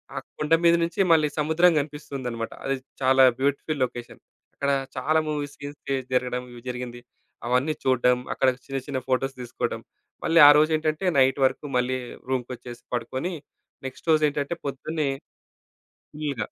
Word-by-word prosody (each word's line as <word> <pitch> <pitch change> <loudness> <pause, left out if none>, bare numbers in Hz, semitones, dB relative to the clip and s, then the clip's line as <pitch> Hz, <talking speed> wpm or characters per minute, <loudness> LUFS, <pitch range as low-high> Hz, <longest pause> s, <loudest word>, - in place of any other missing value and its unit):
ఆ - - -5 0.2
కొండ 150 +1 0
మీద 170 0 +7
నుంచి 170 +3 -3
మళ్ళీ 155 -2 +5
సముద్రం 160 +4 +4
గనిపిస్తుందన్నమాట. 140 -6 -5
అది 135 - +1 0.3
చాలా 130 0 +5 0.2
బ్యూటిఫుల్ 140 +1 -1
లొకేషన్. 120 -1 -9 0.3
అక్కడ 140 0 0 0.3
చాలా 155 +1 +2
మూవీస్ 145 -2 -3
సీన్స్ 145 +1 -8
తీస్ 135 -2 -1
జరగడం 125 0 0 0.3
జరిగింది. 125 -1 -6 0.5
అవన్నీ 125 +5 +2
చూడడం, 125 -1 +3 0.2
అక్కడ 135 - +1 0.2
చిన్న, 135 0 -3
చిన్న 135 -2 -2
ఫోటోస్ 135 +1 0
దీసుకోవడం. 120 -1 -3 0.4
మళ్ళీ 165 0 +4
ఆరోజేంటంటే, 155 +3 +3
నైట్ 135 +1 +3
వరకు 130 - -1
మళ్ళీ 125 +1 0 0.3
రూమ్‌కొచ్చేసి 125 -2 -4
పడుకొని, 130 +9 -3 0.5
నెక్స్ట్ 135 +5 -7
రోజేంటంటే 150 0 +2
పొద్దున్నే 145 +2 -2 1.0
ఫుల్‌గా. 145 -8 -3
135 Hz, 130 wpm, -25 LUFS, 125-150 Hz, 1.0 s, మీద